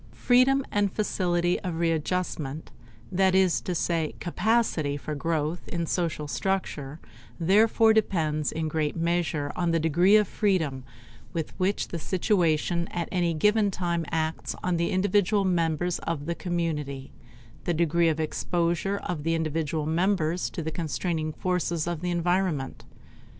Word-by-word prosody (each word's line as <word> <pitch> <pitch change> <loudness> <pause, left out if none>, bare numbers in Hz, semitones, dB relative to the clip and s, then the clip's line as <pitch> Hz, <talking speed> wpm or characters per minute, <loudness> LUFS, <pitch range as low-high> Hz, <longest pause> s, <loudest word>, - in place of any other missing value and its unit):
Freedom 260 +2 +4
and 205 -1 +1
facility 175 -4 0
of 180 -4 -4
readjustment, 165 -2 -2 0.4
that 190 0 +3
is 190 -2 +3
to 180 - -3
say 165 -2 -1
capacity 175 -7 0
for 150 +1 -5
growth 155 +2 -2
in 170 -1 -2
social 165 -3 -2
structure, 155 -5 -2 0.4
therefore 220 +5 +4
depends 155 -8 +1
in 160 0 -2
great 155 -1 -1
measure 165 -3 0
on 175 -1 0
the 165 0 +2
degree 170 +6 +4
of 210 -2 +4
freedom 160 -11 0 0.5
with 165 -2 -3
which 190 +2 0
the 170 - -4
situation 170 -2 +1
at 170 -2 -4
any 175 -2 +1
given 210 +5 +3
time 175 -3 -1
acts 160 0 -2
on 180 -1 +1
the 170 0 0
individual 200 +1 +2
members 175 -1 0
of 150 -3 -3
the 170 - -1
community 155 -6 -3 0.5
the 175 - +1
degree 170 +1 +3
of 160 0 -1
exposure 170 +4 0
of 175 -4 -3
the 165 +2 0
individual 160 -1 -1
members 170 +1 +1
to 165 - -5
the 160 - -3
constraining 160 0 -2
forces 175 -1 -1
of 170 -2 -3
the 180 - -2
environment. 175 -5 -1
170 Hz, 145 wpm, -27 LUFS, 160-185 Hz, 0.5 s, Freedom